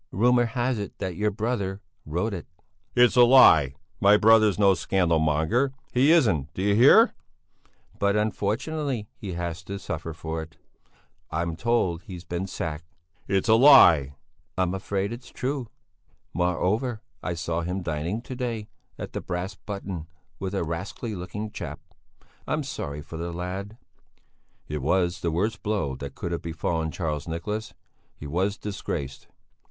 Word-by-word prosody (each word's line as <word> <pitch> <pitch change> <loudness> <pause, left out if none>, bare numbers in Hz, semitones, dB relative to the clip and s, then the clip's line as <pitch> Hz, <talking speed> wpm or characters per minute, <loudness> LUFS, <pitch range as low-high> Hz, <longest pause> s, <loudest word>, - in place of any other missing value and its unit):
"Rumour 120 +4 +3
has 120 0 -1
it 100 - -6
that 95 -2 -4
your 105 +4 +1
brother 105 -2 -2 0.3
wrote 90 +8 -1
it." 90 - -6 0.5
"It's 125 0 +5
a 125 - +7
lie! 80 - +7 0.2
My 100 +1 +6
brother's 110 -1 +5
no 100 -2 +5
scandal 85 -2 +1
monger! 80 - +1 0.2
He 135 +5 +5
isn't! 95 - +3
D'you 100 +2 +1
hear?" 120 +6 +7 0.9
"But 100 0 +2
unfortunately 110 +4 -1
he 95 -4 -7
had 85 -1 -3
to 95 +3 -7
suffer 80 -4 -5
for 80 0 -5
it. 80 -1 -11 0.7
I'm 85 +1 -2
told 90 -4 0
he's 90 0 -9
been 90 +2 -4
sacked." 80 -2 -6 0.3
"It's 95 +2 +1
a 110 - +6
lie!" 90 - +7 0.4
"I'm 95 -1 +1
afraid 100 +2 -2
it's 120 +2 -10
true. 130 -1 -3 0.7
Moreover, 105 +7 0 0.2
I 90 - -3
saw 85 0 -2
him 90 +2 -3
dining 85 +8 -3
to 130 - -7
day 115 -4 -4 0.3
at - - -7
the - - -3
'Brass 90 +2 -4
Button' 95 -5 -6 0.3
with 95 0 -3
a 95 - 0
rascally 90 +7 -4
looking 105 +3 -5
chap. - - -6 0.7
I'm - - 0
sorry 75 +1 -5
for 80 - -8
the 85 +1 -4
lad." 95 +5 -5 0.9
It 75 -1 -4
was 85 +4 +1
the 85 - 0
worst 100 +8 -1
blow 100 -11 -1
that 70 0 -7
could 85 - -4
have 85 - -2
befallen 80 0 -2
Charles 75 -3 -3
Nicholas. 105 +7 -4 0.4
He - - -9
was 95 +7 -1
disgraced. 70 -9 -5
95 Hz, 150 wpm, -26 LUFS, 85-110 Hz, 0.9 s, a